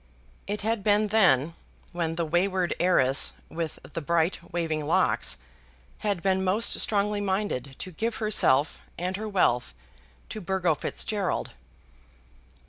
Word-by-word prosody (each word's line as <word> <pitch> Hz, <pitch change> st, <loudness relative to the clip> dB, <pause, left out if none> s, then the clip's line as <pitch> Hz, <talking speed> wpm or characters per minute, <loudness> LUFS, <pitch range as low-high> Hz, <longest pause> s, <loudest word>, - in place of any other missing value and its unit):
It 205 Hz, +1 st, -3 dB
had 220 Hz, -1 st, 0 dB
been 210 Hz, 0 st, +3 dB
then, 170 Hz, -8 st, +4 dB, 0.4 s
when 165 Hz, -2 st, -2 dB
the 170 Hz, 0 st, -1 dB
wayward 180 Hz, +2 st, +1 dB
heiress 145 Hz, -7 st, +3 dB, 0.2 s
with 165 Hz, -1 st, -4 dB
the 165 Hz, -, -6 dB
bright 170 Hz, +3 st, 0 dB
waving 160 Hz, -3 st, -2 dB
locks -, -, +1 dB, 0.6 s
had 200 Hz, -5 st, -1 dB
been 190 Hz, -1 st, +2 dB
most 195 Hz, +5 st, +1 dB
strongly 205 Hz, 0 st, +1 dB
minded 190 Hz, -, -2 dB
to 185 Hz, -, -7 dB
give 220 Hz, +7 st, -2 dB
herself 155 Hz, -, +2 dB, 0.2 s
and 180 Hz, +2 st, -2 dB
her 215 Hz, +2 st, -4 dB
wealth 125 Hz, -, +1 dB, 0.5 s
to 215 Hz, -, -6 dB
Burgo 180 Hz, -2 st, +1 dB
Fitzgerald. 200 Hz, +5 st, -2 dB
185 Hz, 130 wpm, -27 LUFS, 165-205 Hz, 0.6 s, then